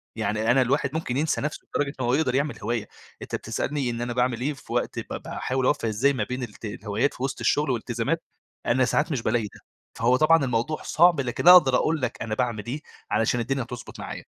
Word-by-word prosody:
يعني 110 +2 0
أنا 130 +2 +4
الواحد 140 +2 +1
ممكن 145 -5 -2
ينسى 155 +1 0
نفسه 150 +1 -4
لدرجة 140 -1 0
إن - - 0
هو 120 - +1
يقدر 135 -3 +1
يعمل 145 +2 -1
هواية، 115 -3 -2 0.3
أنت - - -4
بتسألني 130 +4 -2
إن 115 0 -3
أنا 120 0 -2
باعمل 125 -1 0
إيه 145 +4 0
في 130 - -10
وقت - - -1
ب - - -6
باحاول 130 0 -2
أوفّق 145 -3 +1
إزاي 115 +6 +2
ما 120 - -1
بين 125 +4 -4
الت 115 -1 -8
الهوايات 105 +5 -1
في 125 - -7
وسط 135 -1 -2
الشغل 150 0 +1
والالتزامات، 115 -3 -1 0.4
أنا 130 +1 +3
ساعات 150 +6 +1
مش 135 -5 -1
بالاقي 115 +1 +1
ده، - - -15 0.4
فهو 120 +3 +3
طبعًا 160 +1 +5
الموضوع 125 +5 -1
صعب، 170 -2 +4
لكن 130 +5 -2
أقدر 170 -8 +9
أقول 155 +4 +1
لك 125 -1 -3
أنا 110 -1 -2
باعمل 115 -4 -1
إيه 140 +5 -4 0.3
علشان 115 +2 +2
الدنيا 130 +2 -1
تضبط 120 0 -9
معايا. - - -6
125 Hz, 215 wpm, -25 LUFS, 120-145 Hz, 0.4 s, أقدر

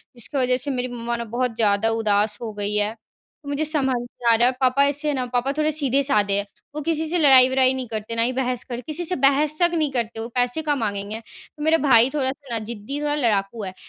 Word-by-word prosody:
जिसकी 250 +4 -5
वजह 250 -1 +2
से 280 +3 -4
मेरी 250 -1 -2
मम्मा 235 0 -3
ना 235 - -4
बहुत 245 -1 -1
ज़्यादा 215 -1 +2
उदास 210 -1 +1
हो 230 -2 -4
गई 205 0 -3
है। 210 +1 +1
तो 285 +6 -17
मुझे 285 +2 -1
समझ 285 -4 0
नहीं 240 0 -5
आ - - +6
रहा 235 +2 +4
है, - - +3
पापा 260 +2 +4
ऐसे 290 +2 -2
है 295 - +1
ना 255 -2 -2
पापा 250 +2 +1
थोड़े 310 0 +1
सीधे-साधे 275 -8 +1
हैं 200 - -1 0.3
वो 300 - -3
किसी 320 +1 -1
से 355 - 0
लड़ाई-वड़ाई 260 -3 +6
नहीं 260 -1 -4
करते 220 0 -5
ना 230 - +1
ही 245 +2 +1
बहस 255 -1 -2
कर 240 0 -4
किसी 320 +3 -4
से 360 - -2
बहस 285 +2 +2
तक 345 -1 +4
नहीं 310 -4 0
करते 235 -3 -2
वो 225 - -4
पैसे 245 +4 0
कहाँ 300 -2 0
माँगेगें? 205 -2 -3
तो 295 +5 -13
मेरा 320 +1 +4
भाई 235 -1 +6
थोड़ा-सा 275 -1 -3
ना 230 - 0
ज़िद्दी, 235 +5 -5
थोड़ा 295 0 0
लड़ाकू 220 -5 0
है 185 -1 -5
255 Hz, 240 wpm, -22 LUFS, 225-285 Hz, 0.3 s, आ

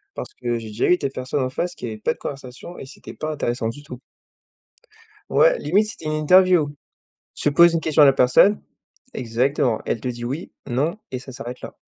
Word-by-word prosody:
parce - - -7
que 120 -2 -3
j'ai 110 - -9
déjà 105 +2 -1
eu 180 - +5
des 140 -4 -2
personnes 130 +1 -3
en 130 - -1
face 175 +7 -3
qui - - -7
avaient 110 -2 -5
pas - - -1
de - - -24
conversation 135 +5 -8
et - - -8
c'était - - -12
pas 155 0 -4
intéressant 120 -6 -2
du 145 +5 -9
tout. 125 -4 -10 1.3
Ouais - - +4
limite 210 +3 +1
c'était 165 - -10
une 155 - -2
interview. 175 0 +4 0.7
Tu 145 - 0
poses 170 +1 +6
une 165 - +1
question 155 -1 +3
à - - +9
la 135 - +5
personne 135 +11 +4 0.5
exactement, 120 0 0
elle 115 - -2
te 125 - -4
dit: 120 -1 -5
«Oui, 140 +8 -5 0.2
non» 145 - -1 0.2
et 130 - -2
ça 130 - -11
s'arrête 125 0 -8
là. - - -9
135 Hz, 210 wpm, -22 LUFS, 125-160 Hz, 1.3 s, à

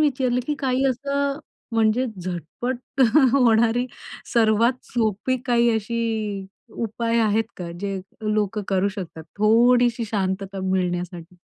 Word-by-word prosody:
विचारलं, 260 -4 +1
की 300 - 0
काही 265 -1 0
असं 280 +2 -1 0.3
म्हणजे 225 +3 +2
झटपट 210 - -5 0.3
होणारी 235 -1 +3 0.5
सर्वात 230 +2 +3
सोपी 225 +2 0
काही 240 -1 +3
अशी 220 +2 -3 0.9
उपाय 230 +1 -1
आहेत 220 +1 +2
का, 175 -2 -6
जे 195 -1 -3 0.3
लोकं 210 0 0
करू 195 0 +2
शकतात. 180 -5 -7
थोडीशी 235 +2 +4
शांतता 195 -1 -2
मिळण्यासाठी? 180 -1 -2
225 Hz, 110 wpm, -23 LUFS, 195-250 Hz, 0.9 s, थोडीशी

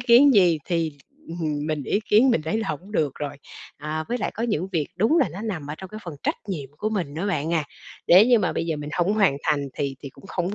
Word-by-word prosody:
kiến 245 +3 +6
gì 175 -6 +5
thì, 165 -4 -1 0.3
ừm, 155 -3 -3
mình 155 -2 -2
ý 200 - 0
kiến 235 +5 +6
mình 160 - +1
thấy 160 +8 -1
là 220 -3 -3
hổng 190 +8 -5
được 150 -8 +1
rồi. 145 -1 -4 0.4
À, 155 +2 -4
với 245 - -1
lại - - -2
có 225 - -4
những 195 -6 -1
việc 155 -5 0
đúng 225 - +3
là 270 - +3
nó 175 +5 -8
nằm 180 -10 -4
ở 150 - -3
trong 190 - -8
cái 215 - -8
phần 170 - -6
trách - - +1
nhiệm 145 -8 -4
của 215 - -1
mình 180 -9 -2
nữa 170 +6 -2
bạn 165 -3 0
à, 155 - +1 0.4
nếu 190 +5 +8
như 245 -2 +5
mà 185 -4 0
bây 165 - -2
giờ 160 - -1
mình 150 0 -6
hông 180 +5 +1
hoàn 195 -10 +3
thành 145 -2 0
thì 140 -1 -2
thì 140 - -7
cũng 195 - -16
không 185 +1 -2
175 Hz, 270 wpm, -24 LUFS, 150-210 Hz, 0.4 s, nếu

